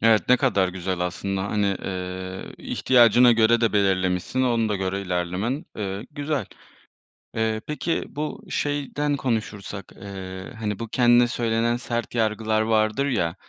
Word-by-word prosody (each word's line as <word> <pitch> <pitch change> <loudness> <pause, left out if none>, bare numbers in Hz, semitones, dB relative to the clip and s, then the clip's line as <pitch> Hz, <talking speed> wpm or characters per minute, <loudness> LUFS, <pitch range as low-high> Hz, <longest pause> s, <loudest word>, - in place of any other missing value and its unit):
Evet, 110 -1 +4
ne 125 - +7
kadar 100 -8 +2
güzel 90 0 -3
aslında. 95 +2 -2
Hani, 100 -1 0
eee, 95 0 -5
ihtiyacına 120 -1 +5
göre 115 +1 +4
de 115 -2 +2
belirlemişsin, 95 +4 +1
ona 115 -3 +2
da 105 - 0
göre 95 0 -2
ilerlemen, 90 - -2
eee, 100 +2 -4
güzel. 145 -1 -2 0.9
Eee, 110 -1 0
peki, 155 +2 -1
bu 150 +2 -5
şeyden 145 0 -1
konuşursak, 110 -6 -3 0.2
eee, 95 +3 -7
hani, 105 -2 -3
bu 115 - -4
kendine 120 +1 +4
söylenen 115 -1 0
sert 120 0 -4
yargılar 110 -1 +1
vardır 110 +3 +2
ya, 95 -10 0
110 Hz, 140 wpm, -24 LUFS, 95-120 Hz, 0.9 s, ne